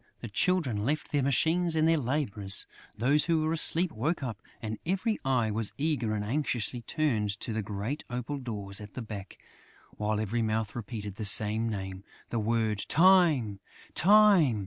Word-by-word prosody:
The -, -, -6 dB
Children 150 Hz, -, 0 dB
left 150 Hz, +6 st, -2 dB
their 145 Hz, -2 st, +1 dB
machines 160 Hz, +5 st, +2 dB
and 160 Hz, 0 st, +3 dB
their 165 Hz, -, +4 dB
labours; 115 Hz, -7 st, -1 dB, 0.3 s
those 140 Hz, +6 st, +2 dB
who 165 Hz, -2 st, +1 dB
were 160 Hz, +1 st, 0 dB
asleep 165 Hz, +2 st, +4 dB
woke 145 Hz, +7 st, -2 dB
up; 115 Hz, -6 st, -5 dB, 0.2 s
and 110 Hz, -1 st, -5 dB
every 195 Hz, +5 st, -1 dB
eye 125 Hz, -5 st, +1 dB
was 110 Hz, 0 st, -1 dB
eagerly 140 Hz, -8 st, -1 dB
and 105 Hz, -1 st, -3 dB
anxiously 125 Hz, -2 st, -1 dB
turned 115 Hz, -6 st, -1 dB
to 115 Hz, -, -4 dB
the 110 Hz, -, -1 dB
great 105 Hz, +8 st, -4 dB
opal 125 Hz, +4 st, -4 dB
doors 105 Hz, -5 st, -5 dB
at 105 Hz, -1 st, -11 dB
the 125 Hz, -, -5 dB
back, 105 Hz, -3 st, -8 dB, 0.6 s
while 105 Hz, 0 st, -1 dB
every 110 Hz, +2 st, -1 dB
mouth 110 Hz, -1 st, -2 dB
repeated 105 Hz, -3 st, -6 dB
the 110 Hz, -, -4 dB
same 110 Hz, +2 st, +4 dB
name. 95 Hz, -2 st, -6 dB, 0.3 s
The 115 Hz, -, -1 dB
word, 110 Hz, -1 st, 0 dB
"Time! 160 Hz, -, +4 dB, 0.3 s
Time!" 195 Hz, -, +5 dB
120 Hz, 170 wpm, -29 LUFS, 105-155 Hz, 0.6 s, Time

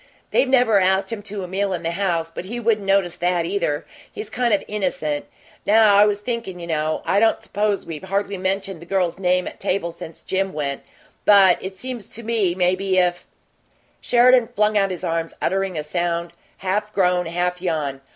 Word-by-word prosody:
They've 270 Hz, -, +2 dB
never 245 Hz, -6 st, +4 dB
asked 190 Hz, +1 st, +2 dB
him 225 Hz, -2 st, -4 dB
to 205 Hz, -1 st, -5 dB
a -, -, -5 dB
meal 195 Hz, +1 st, -1 dB
in 175 Hz, -1 st, -4 dB
the 165 Hz, -, -1 dB
house, 170 Hz, -3 st, -1 dB
but 180 Hz, -, -6 dB
he 235 Hz, +5 st, -5 dB
wouldn't 215 Hz, -3 st, 0 dB
notice 195 Hz, -3 st, +2 dB
that, 175 Hz, -1 st, 0 dB
either 165 Hz, -5 st, -1 dB, 0.3 s
he's 425 Hz, -, -7 dB
kind 245 Hz, -2 st, 0 dB
of 205 Hz, -, +2 dB
innocent. 170 Hz, -8 st, -2 dB, 0.4 s
Now 215 Hz, 0 st, +5 dB
I 205 Hz, +1 st, +6 dB
was 205 Hz, 0 st, -1 dB
thinkin' 230 Hz, -6 st, -4 dB
you 170 Hz, -, -6 dB
know, 155 Hz, -1 st, -1 dB
I 200 Hz, -, +2 dB
don't 225 Hz, +1 st, +2 dB
suppose 205 Hz, -1 st, -1 dB
we've 165 Hz, +1 st, -7 dB
hardly 200 Hz, 0 st, -2 dB
mentioned 190 Hz, -1 st, -2 dB
the 170 Hz, -, -12 dB
girl's 185 Hz, -2 st, 0 dB
name 180 Hz, -1 st, +1 dB
at -, -, -8 dB
table 175 Hz, -3 st, -1 dB
since 165 Hz, -1 st, -10 dB
Jim 190 Hz, 0 st, -1 dB
went, 140 Hz, -2 st, -3 dB, 0.4 s
but 195 Hz, -3 st, +6 dB
it 190 Hz, 0 st, -7 dB
seems 245 Hz, 0 st, -6 dB
to 235 Hz, -, -8 dB
me 215 Hz, -6 st, 0 dB
maybe 185 Hz, +1 st, +1 dB
if 175 Hz, -1 st, +1 dB, 0.4 s
" -, -, -39 dB
Sheridan 245 Hz, 0 st, +5 dB
flung 210 Hz, +1 st, +2 dB
out 195 Hz, -1 st, +3 dB
his 180 Hz, -3 st, -6 dB
arms, 165 Hz, 0 st, -2 dB
uttering 190 Hz, -1 st, -1 dB
a 150 Hz, -, -2 dB
sound 170 Hz, +2 st, -2 dB, 0.2 s
half 205 Hz, +3 st, -2 dB
groan, 180 Hz, -2 st, +2 dB
half 180 Hz, +1 st, -2 dB
yawn. 150 Hz, -6 st, -2 dB
190 Hz, 200 wpm, -22 LUFS, 175-205 Hz, 0.4 s, I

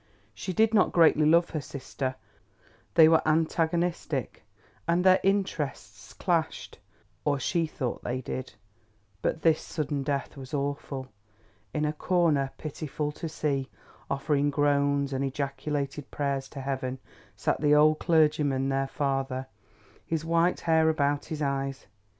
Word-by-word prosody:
She 185 Hz, -, -5 dB
did 220 Hz, +4 st, +3 dB
not 205 Hz, -, +4 dB
greatly 155 Hz, -3 st, +5 dB
love 170 Hz, +2 st, +4 dB
her 155 Hz, -, -2 dB
sister, 130 Hz, -1 st, -5 dB, 0.8 s
they 160 Hz, -2 st, +9 dB
were 160 Hz, 0 st, +5 dB
antagonistic 165 Hz, -3 st, 0 dB, 0.4 s
and 170 Hz, +1 st, +2 dB
their 185 Hz, 0 st, +6 dB
interests 140 Hz, -, -2 dB
clashed, 170 Hz, -4 st, -1 dB, 0.4 s
or 145 Hz, -1 st, +1 dB
she 165 Hz, +3 st, 0 dB
thought 130 Hz, -5 st, -4 dB
they 125 Hz, +1 st, -2 dB
did, 130 Hz, +1 st, -5 dB, 0.7 s
but 160 Hz, -, -1 dB
this 160 Hz, -2 st, +4 dB
sudden 150 Hz, -3 st, -3 dB
death 140 Hz, +1 st, -2 dB
was 135 Hz, +1 st, -6 dB
awful. 140 Hz, -1 st, -3 dB, 0.6 s
In 150 Hz, +6 st, -1 dB
a 150 Hz, -, 0 dB
corner, 155 Hz, -5 st, +2 dB
pitiful 150 Hz, 0 st, -4 dB
to 160 Hz, +2 st, -6 dB
see, 140 Hz, -3 st, -1 dB, 0.4 s
offering 145 Hz, +1 st, +1 dB
groans 140 Hz, -1 st, +1 dB
and 135 Hz, +1 st, -1 dB
ejaculated 140 Hz, +1 st, -3 dB
prayers 140 Hz, -2 st, -2 dB
to 135 Hz, -, -7 dB
heaven, 130 Hz, -1 st, -3 dB, 0.4 s
sat -, -, -1 dB
the 150 Hz, -1 st, +5 dB
old 155 Hz, +1 st, +5 dB
clergymen, 150 Hz, -5 st, +2 dB
their 135 Hz, 0 st, 0 dB
father, 135 Hz, -1 st, -2 dB, 0.6 s
his 160 Hz, -1 st, -3 dB
white 170 Hz, +2 st, +2 dB
hair 160 Hz, -1 st, +3 dB
about 145 Hz, -2 st, +1 dB
his 155 Hz, -1 st, -4 dB
eyes. 135 Hz, 0 st, -2 dB
145 Hz, 135 wpm, -28 LUFS, 135-160 Hz, 0.8 s, they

